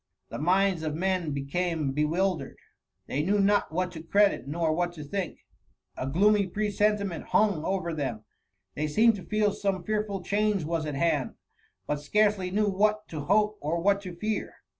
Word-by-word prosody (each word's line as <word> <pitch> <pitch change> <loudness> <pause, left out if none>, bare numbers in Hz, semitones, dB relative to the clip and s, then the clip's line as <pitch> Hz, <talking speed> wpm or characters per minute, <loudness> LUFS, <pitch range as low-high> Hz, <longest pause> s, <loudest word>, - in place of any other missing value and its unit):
The - - -6
minds 185 +2 +2
of 155 -1 -2
men 185 -1 0
became 150 +2 -1
be 145 +3 -1
i 150 - +3
wildered; 185 +2 -1 0.5
they 140 - -1
knew 195 +7 +1
not 200 -2 +2
what 180 +2 -1
to 160 - -8
credit 200 -4 +2
nor 160 +2 0
what 175 +1 -1
to 155 -3 -8
think; 185 +5 -4 0.5
a 130 - -4
gloomy 200 +7 +3
presentiment 205 -2 0
hung 200 -8 +2
over 185 -2 -1
them; 125 -8 -4 0.5
they 155 +1 -2
seemed 220 +9 +4
to 185 - -9
feel 210 +3 +1
some 195 -3 -2
fearful 210 -2 -2
change 205 -1 +1
was 160 0 -2
at 150 - -3
hand, 150 -3 0 0.5
but 150 - -1
scarcely 205 +3 +2
knew 210 +3 +1
what 210 +2 +1
to 150 -3 -5
hope 210 +3 +2
or 160 +3 -1
what 200 +3 +2
to 180 -3 -8
fear. 215 +4 -3
185 Hz, 180 wpm, -28 LUFS, 155-205 Hz, 0.5 s, seemed